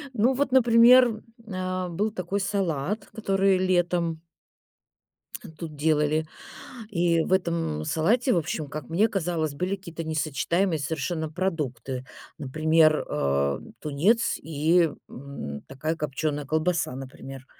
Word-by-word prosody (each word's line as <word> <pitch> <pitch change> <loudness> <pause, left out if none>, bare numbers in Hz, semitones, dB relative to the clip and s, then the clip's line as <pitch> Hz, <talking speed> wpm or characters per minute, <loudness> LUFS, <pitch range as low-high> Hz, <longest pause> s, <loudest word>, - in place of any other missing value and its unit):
Ну, 240 +4 +3
вот, 275 +1 0
например, 240 -2 +6 0.3
а, 185 -1 -3
был 205 +6 -1
такой 195 0 -3
салат, 195 0 -1
который 195 -3 +2
летом 175 -3 0 1.4
тут 160 -3 -7
делали, 155 +1 +1 0.6
и 170 -4 +2
в 185 - 0
этом 165 - 0
салате, 235 - +2
в - - +2
общем, 155 -2 -2
как 150 +2 -7
мне 190 +7 +3
казалось, 170 -7 -2
были 180 +6 -2
какие-то 170 -4 -8
несочетаемые 160 +3 0
совершенно 160 +2 -3
продукты. 135 -8 -3 0.3
Например, 155 +2 +3
а, 70 0 0 0.2
тунец 180 +11 +1
и, 160 +2 +2 0.2
м, 120 - -7
такая 155 +5 -3
копчёная 150 -1 -2
колбаса, 155 -2 0
например. 135 0 -9
165 Hz, 115 wpm, -26 LUFS, 150-190 Hz, 1.4 s, например